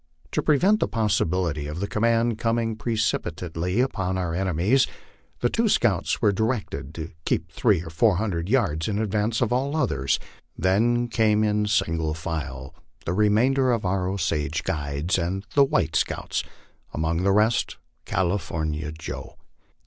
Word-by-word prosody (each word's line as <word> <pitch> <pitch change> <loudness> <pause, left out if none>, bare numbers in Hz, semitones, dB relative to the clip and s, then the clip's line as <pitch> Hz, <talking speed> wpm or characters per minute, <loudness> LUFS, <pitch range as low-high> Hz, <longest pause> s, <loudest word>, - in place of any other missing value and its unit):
To - - 0
prevent 185 +9 +3
the - - +1
possibility 90 -8 0
of 75 +3 -5
the 100 - -1
command 115 +1 +1
coming 115 -1 0
precipitately 90 -4 -1
upon 95 -8 -1
our 90 -3 -2
enemies, 95 - +2 0.5
the 120 - +3
two 225 -1 +2
scouts 110 - +1
were 105 - +5
directed 100 - -2
to 80 0 -6
keep - - -1
three 85 - +2
or 80 - -8
four 95 +5 +3
hundred 90 -3 -2
yards 100 - +1
in 105 -2 -1
advance 105 +1 0
of 120 0 +1
all 135 +4 0
others; 70 - +1 0.4
then 115 +7 +2
came, 110 -2 +2
in 105 0 +1
sin 95 -6 +1
gle 80 -1 -1
file, 80 -5 -5 0.3
the 85 - -1
remainder 120 +6 +3
of 115 -4 0
our 90 0 0
Osage 80 -6 -1
guides 75 +5 -1
and 95 +4 -2
the 140 - +6
white 135 - +1
scouts - - -1 0.5
among 80 +2 0
the 100 +1 +3
rest 105 +3 +2 0.3
California 80 -5 -1
Joe. 80 +1 -7
100 Hz, 150 wpm, -25 LUFS, 80-115 Hz, 0.5 s, the